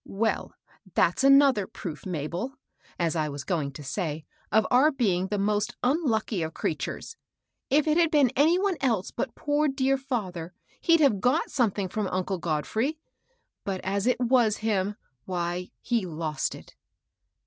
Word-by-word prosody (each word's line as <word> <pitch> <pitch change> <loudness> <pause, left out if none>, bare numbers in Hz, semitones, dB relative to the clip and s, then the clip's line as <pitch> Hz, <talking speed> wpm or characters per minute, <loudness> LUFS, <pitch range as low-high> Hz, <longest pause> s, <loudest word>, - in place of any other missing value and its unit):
Well, 220 +3 -2 0.4
that's 175 +9 +3
another 275 -7 +6
proof, 160 +1 -7
Mabel, 175 - -3 0.4
as 170 -1 0
I 155 -2 0
was 140 -1 -6
going 145 -3 -1
to 150 - -9
say, 150 +1 -3 0.3
of 220 +1 +4
our 260 +5 +6
bdng 195 - 0
the 210 - -1
most 205 +1 0
unlucky 245 - +1
of 160 0 -4
crea 155 - -1
tures 305 - -6 0.6
I - - +4
If 300 +1 +3
it 310 +1 +3
had 335 -2 +4
been 290 -6 +4
any 315 +6 +4
one 385 -2 0
else 225 -8 0
but 265 - -4
poor, 295 +1 +1
dear 270 -1 +1
fether, 190 -10 -4 0.3
he'd 335 -2 +4
have 230 -10 +3
got 265 +7 +1
something 205 -6 +1
from 205 +2 -2
uncle 185 0 -2
God 155 -3 -1
frey; 270 +8 -1 0.7
but 195 -2 -3
as 200 +3 -1
it 250 -1 +2
wa» 245 -2 +4
him, 210 -2 -1 0.3
why 175 0 -3
— - - -52
he 230 -6 0
lost 155 -3 -2
it." - - -14
210 Hz, 170 wpm, -27 LUFS, 175-270 Hz, 0.7 s, another